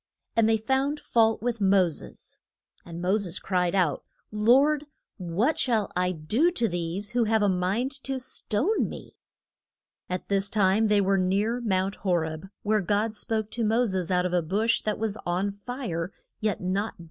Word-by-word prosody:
And 225 -1 +4
they 225 - +4
found 265 +6 0
fault 225 -4 +2
with 235 -2 -2
Mo 190 -2 +4
ses. 160 - -8 0.4
And 170 0 -8
Mo 190 +4 +2
ses 185 -3 -4
cried 180 -1 0
out, 170 -8 +1 0.3
Lord, 270 +8 +3 0.3
what 195 - 0
shall 225 -6 +1
I 180 0 +1
do 210 - +1
to 240 -10 0
these, 175 +3 -3
who 240 -1 +2
have 220 -1 +2
a - - +4
mind 195 +8 0
to 270 -1 -1
stone 260 - 0
me? - - -10 0.9
At 180 0 -4
this 200 0 +1
time 205 +1 +3
they 210 -1 +3
were 195 0 +2
near 205 +6 0
Mount 195 -2 0
Ho 185 -3 0
reb, 160 +2 -3
where 215 0 +2
God 210 +4 0
spoke 220 0 -2
to 235 - -2
Mo 225 +3 +2
ses 190 -5 -2
out 180 -1 +2
of 180 - -2
a 175 - +3
bush 210 +8 +1
that 215 -1 -2
was 220 -1 -2
on 185 +3 -1
fire, 200 -5 -5 0.3
yet 215 -3 -1
not 195 +4 -1
burnt. - - -35
205 Hz, 180 wpm, -26 LUFS, 185-225 Hz, 0.9 s, And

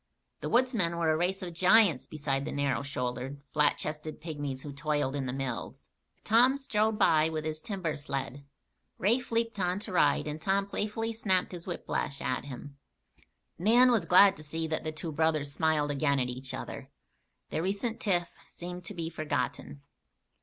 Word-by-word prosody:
The - - -4
woodsmen 230 -9 +2
were 165 -2 +2
a - - +2
race 185 +4 -1
of 175 -2 -5
giants 185 - +4
beside 140 -3 -2
the 155 - -4
narrow 140 -1 0
shouldered, 130 0 -4
flat 150 -1 +3
chested 155 0 -4
pygmies 145 -5 -5
who 145 - -7
toiled 145 -1 -1
in 135 -2 -2
the - - -2
mills. 130 -2 -4 0.4
Tom 245 +5 +5
strode 220 -5 0
by 155 -4 +4
with 155 -1 -3
his 155 0 -3
timber 185 -7 -3
sled. 140 -2 -4 0.5
Rafe 235 +7 +1
leaped 230 -2 0
on 180 0 +1
to 210 - -5
ride 180 - +3
and 150 +1 -5
Tom 195 +2 +1
playfully 215 +3 -2
snapped 190 -5 +1
his 175 -1 -8
whiplash 155 -5 -3
at 130 - -2
him. 140 +1 -9 0.8
Nan 240 +7 +6
was 220 -8 +2
glad 190 +3 +7
to - - -10
see 160 +2 -3
that 155 0 -2
the 155 - -2
two 160 +1 -5
brothers 155 -2 +1
smiled 150 -1 +1
again 140 -1 +1
at 125 -1 0
each 130 +1 -5
other. - - -7 0.6
Their - - -1
recent 205 +6 -2
tiff 175 -7 +1 0.2
seemed 180 +1 -8
to 205 - -6
be 165 -2 -3
forgotten. 150 - -3
160 Hz, 175 wpm, -30 LUFS, 145-195 Hz, 0.8 s, glad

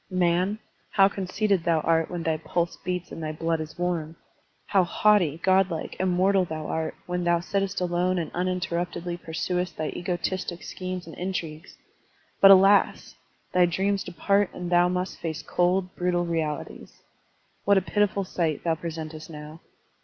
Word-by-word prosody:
Man, 185 +2 +1 0.3
how 195 -1 +5
conceited 195 -1 0
thou 165 -2 +2
art 165 0 +2
when 175 -2 -4
thy 160 -1 0
pulse 170 +2 -2
beats 180 -1 -4
and 165 - -7
thy 155 -1 -3
blood 165 +1 -1
is 155 0 -8
warm! 170 -3 -2 0.5
How 195 -3 +3
haughty, 175 -4 +3
god 190 0 +4
like, 165 -3 -5
immortal 185 +1 +3
thou 160 -3 -5
art 160 +1 -2
when 180 0 -2
thou 175 0 +3
sittest 195 +2 -1
alone 180 +1 0
and 165 -3 -3
uninterruptedly 175 -1 -2
pursuest 180 +1 -3
thy 155 - -2
egotistic 175 0 -3
schemes 185 -1 -5
and 165 - -10
intrigues! 170 -3 -5 0.6
But, 195 - +9
alas! 195 +1 +5 0.4
thy 180 -1 +5
dreams 195 +3 0
depart 200 +2 +1
and 180 0 -5
thou 175 0 +5
must 180 +1 -3
face 160 -1 -4
cold, 180 +1 0
brutal 175 -1 0
realities. 160 -3 -4 0.6
What 200 -1 +5
a - - +4
pitiful 205 0 +1
sight 165 -5 -2
thou 165 - +2
presentest 160 -1 -6
now! 150 0 -9
175 Hz, 155 wpm, -26 LUFS, 165-185 Hz, 0.6 s, But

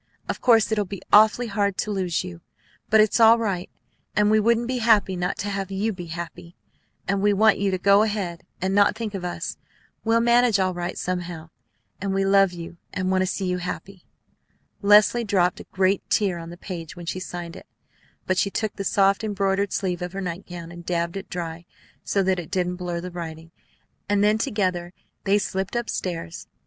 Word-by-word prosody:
Of - - -4
course 225 -3 +4
it'll 210 -1 +2
be 195 -1 -8
awfully 215 +3 +6
hard 200 -3 -1
to 215 - -2
lose 185 -4 -1
you; 175 -2 -9 0.5
but 220 - +5
it's 215 +2 +2
right, 225 -5 +4 0.5
and 210 0 +3
we 215 - +5
wouldn't 235 +2 +2
be 255 0 -1
happy 220 -4 +3
not 180 0 -2
to 205 - -3
have 195 -1 -3
you 200 +3 -1
be 175 -2 -8
happy; 170 +1 -7 0.5
and 195 0 0
we 205 0 +3
want 215 +2 +4
you 200 0 +1
to 185 - 0
go 200 +2 +5
ahead 200 -6 -2 0.2
and 190 +1 -1
not 200 0 +4
think 220 -2 -4
of 195 -2 -5
us. 180 - -4 0.5
We'll 230 0 +3
manage 235 -2 +4
all 185 -1 +1
right 175 0 -4
somehow, 175 -3 -4 0.5
and 195 0 -1
we 195 0 +1
love 195 -1 +4
you 170 -1 -9
and 185 0 -1
want 185 0 +2
to 185 - +1
see 190 +1 -2
you 180 0 -1
happy." 180 +1 -7 0.7
Leslie 210 +3 +5
dropped 185 -4 +1
a - - -9
great 190 +1 +1
tear 190 -5 +1
on 165 0 -8
the 175 - -10
page 175 -3 -7
when 175 -1 -9
she 185 - -3
signed 175 -2 -6
it; - - -12 0.6
but 185 0 +1
she 200 - +2
took 215 +1 -3
the 200 - -3
soft, 195 +1 +2
embroidered 200 -1 0
sleeve 180 -2 -2
of 180 +1 -4
her 195 - -4
nightgown, 175 -1 -6
and 175 0 -10
dabbled 170 +1 -2
it 195 - -8
dry, 170 -1 -5 0.4
so 195 - +1
that 185 -1 +1
it 165 - -7
didn't 180 -1 -1
blur 175 -1 -3
the 180 +1 -6
writing; 165 -1 -7 0.6
and 205 0 +3
then 210 +1 +3
together 185 -5 -1 0.3
they 200 +1 +4
slipped 190 +1 -3
up 240 -1 -1
stairs. 165 - -5
190 Hz, 200 wpm, -24 LUFS, 175-205 Hz, 0.7 s, awfully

